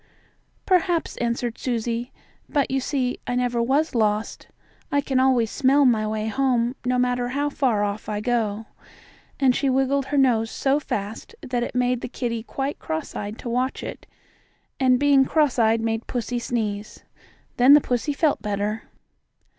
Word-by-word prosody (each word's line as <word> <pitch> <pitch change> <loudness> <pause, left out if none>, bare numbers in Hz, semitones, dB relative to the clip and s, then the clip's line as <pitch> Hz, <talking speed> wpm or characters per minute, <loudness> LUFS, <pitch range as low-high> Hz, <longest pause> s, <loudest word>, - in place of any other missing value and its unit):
"Perhaps," 360 -3 +1
answered 235 0 -2
Susie. 235 0 -2 0.4
"But 285 -4 0
you 270 - +1
see 255 -2 -2
I 245 - -1
never 245 -1 0
was 275 +6 +1
lost. 215 -2 -1 0.4
I 285 - +3
can 270 -2 0
always 255 -4 +3
smell 280 0 +3
my 220 -4 +3
way 215 0 -2
home, 245 0 +1
no 250 0 +1
matter 250 0 +1
how 285 +3 -1
far 240 -8 +1
off 205 +1 -3
I 210 -1 -2
go," 220 -2 -1 0.7
and 260 -3 +4
she 275 - +1
wiggled 270 +1 +1
her 290 - -1
nose 235 -5 +3
so 275 +4 +1
fast 215 - -5
that 245 -1 -2
it 240 - -4
made 250 -1 +1
the - - -5
kittie 235 -2 -3
quite 270 +5 -4
cross 160 0 -4
eyed 205 +2 -5
to 240 - -6
watch 250 +2 -1
it, - - -8 0.7
and 255 -2 +4
being 285 -1 +5
cross 290 -2 +1
eyed 225 0 +3
made 225 0 -2
pussy 245 0 -2
sneeze. 215 -3 -3 0.5
Then 255 +3 +7
the - - +7
pussy 255 +2 -1
felt 295 -5 +1
better. 210 +1 -2
245 Hz, 165 wpm, -23 LUFS, 225-270 Hz, 0.7 s, Then